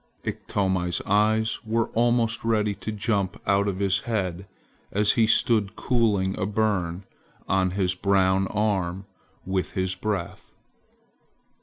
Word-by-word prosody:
Iktomi's 95 -3 -1
eyes 110 +2 +2
were 115 0 0
almost 120 -1 +1
ready 105 -2 +1
to 110 - -6
jump 100 -2 -1
out 100 0 +2
of 95 -2 -2
his 95 -1 +1
head 95 -5 -3 0.4
as 105 +1 +3
he 115 -2 +3
stood 110 -2 +2
cooling 105 -6 +1
a 95 - 0
burn 100 -4 -1 0.4
on 95 -1 +2
his 90 -2 +1
brown 95 0 +2
arm 95 -3 -1 0.4
with 95 -1 -2
his 95 -2 -1
breath. 95 -1 -4
100 Hz, 125 wpm, -25 LUFS, 95-110 Hz, 0.4 s, as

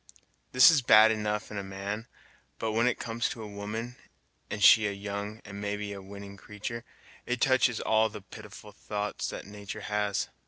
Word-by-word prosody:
This 125 +6 +8
is 150 -4 +3
bad 110 -2 +7
enough 105 -1 -2
in 105 - -4
a - - -5
man, 100 +4 -5 0.5
but 110 - -2
when 115 +3 +2
it 125 - +1
comes 115 +1 -2
to 115 - -6
a - - -7
woman, 105 +4 -6 0.5
and 105 - -3
she 110 -1 +8
a - - -1
young, 100 +2 -5
and 100 -1 -8
maybe 105 0 -3
a 100 - -8
winning 100 +1 -10
creatur' 110 +4 -6 0.4
it 125 0 -1
touches 130 -2 +3
all 110 0 +2
the 105 - -9
pitiful 105 +1 -12
thoughts 105 0 -4
his - - -7
natur' 105 +1 -8
has. 105 -1 -1
105 Hz, 185 wpm, -29 LUFS, 100-110 Hz, 0.5 s, This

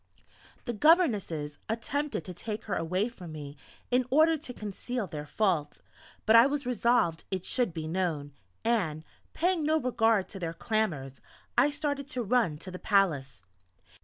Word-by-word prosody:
The 240 - -2
governesses 210 - +2
attempted 255 - -2
to 180 - -6
take 210 +4 -5
her 205 - -4
away 185 +6 0
from 185 -9 -10
me 145 -2 -7 0.4
in 250 0 +2
order 315 +4 +5
to 295 -4 -7
conceal 225 +2 -4
their 150 -4 -7
fault; 165 -4 0 0.5
but 220 - +6
I 230 +3 +9
was 285 -1 -2
resolved 235 -8 +2
it 185 -2 -3
should 245 -7 +2
be 160 -1 -5
known, 160 -5 -2 0.3
and, 180 -10 +1 0.3
paying 355 0 +1
no 310 +1 +2
regard 225 -6 +2
to 195 - -7
their 165 -2 -3
clamours, 165 - -2 0.3
I 290 - +5
started 285 -1 -2
to 250 -3 -3
run 215 -8 +2
to 185 +4 -8
the 180 - -7
palace. 145 - +1
210 Hz, 160 wpm, -29 LUFS, 165-250 Hz, 0.5 s, I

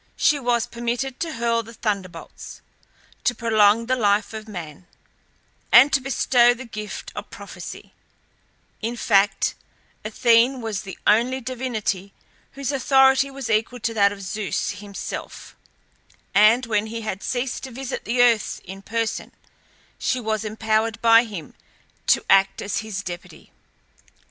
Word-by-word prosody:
She 295 - +3
was 240 -2 +1
permitted 240 +2 -3
to 330 -2 -3
hurl 230 -1 0
the 230 +1 -13
thunderbolts, 200 -5 -5 0.6
to 245 - +1
prolong 220 -1 +3
the 255 +2 +1
life 210 -1 +1
of 220 0 -7
man, 175 -4 -9 0.8
and 265 +5 +8
to 270 - +3
bestow 245 -2 +3
the 260 +2 -9
gift 215 -2 -7
of - - -7
prophecy; - - -10 0.9
in 235 +2 -3
fact 200 -3 +2 0.5
Athene 235 +4 +3
was 220 -4 -3
the 195 -3 -9
only 240 +5 +3
divinity 230 -6 -3 0.4
whose 275 0 -3
authority 265 0 +4
was 270 -2 -6
equal 225 +3 0
to 230 - -1
that 200 -2 +4
of 200 -1 -8
Zeus 195 +2 -2
himself, 200 -1 -8 0.8
and 220 +5 +5
when 215 -1 0
he 230 +1 -5
had 215 -3 -4
ceased 250 0 -2
to 260 - -9
visit 265 +2 -5
the 245 +1 +2
earth 230 -3 +2
in 190 +1 -9
person 225 +2 -3 0.7
she 255 - 0
was 220 -2 -2
empowered 220 +1 -1
by 230 +1 +6
him 190 -10 -8 0.5
to - - +3
act 195 0 +4
as 200 - -2
his 215 -3 -5
deputy. 175 -1 -9
230 Hz, 140 wpm, -23 LUFS, 210-245 Hz, 0.9 s, and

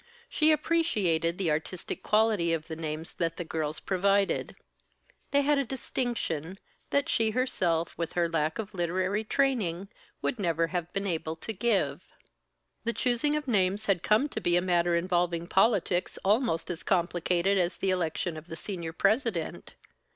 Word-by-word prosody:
She 310 0 +4
appreciated 210 - +1
the 180 -5 0
artistic 160 +4 -3
quality 210 -6 +2
of 165 -1 -3
the 160 - -5
names 160 0 -4
that 165 -1 -2
the 175 - -3
girls 155 -2 -3
provided. 195 +1 +1 0.7
They 285 - +3
had 290 0 +3
a - - +2
distinction, 230 - -3 0.3
that 280 0 +1
she 225 -1 +2
herself, 185 -9 0
with 170 - -2
her 175 -1 +2
lack 160 -1 0
of 215 -1 -5
literary 185 +4 0
training, 210 -8 0 0.3
would 250 - -1
never 165 -3 +1
have 175 -1 -2
been 195 0 -2
able 160 -3 -2
to 220 +7 -5
give. 215 +1 +1 0.8
The 235 0 0
choosing 255 +6 +1
of 300 0 -2
the 255 - -2
names 200 0 +1
had 195 -5 +2
come 215 +10 +3
to - - -4
be 175 0 +2
a - - +5
matter 175 -1 +2
involving 175 -1 0
politics 190 -2 +2
almost 205 -5 +2
as 170 - -5
complicated 180 +1 +1
as 175 0 0
the 195 - 0
election 170 -2 -1
of 155 +2 -10
the 165 - -6
senior 170 -3 -5
president. 200 - 0
185 Hz, 165 wpm, -29 LUFS, 170-220 Hz, 0.8 s, a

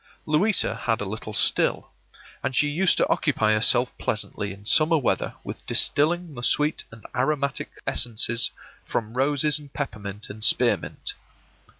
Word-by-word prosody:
Louisa 185 +8 +2
had 115 -1 -1
a 105 - -3
little 110 +2 -6
still, - - +2 0.5
and 130 - -3
she 145 - +3
used 165 +5 +2
to - - +2
occupy 110 -8 +1
herself 120 +3 +3
pleasantly 105 -1 -3
in 100 +1 -12
summer 160 +8 +4
weather 140 - -1
with - - -8
distilling 165 +2 +3
the 120 - -8
sweet 150 +5 +1
and 115 -1 -14
aromatic 140 +2 -1 0.2
essences 120 0 0 0.3
from 110 -1 -3
roses 145 +3 +1
and 145 -2 -14
peppermint 105 -6 -6
and 105 +1 -9
spearmint. 110 - +1
125 Hz, 140 wpm, -24 LUFS, 110-150 Hz, 0.5 s, summer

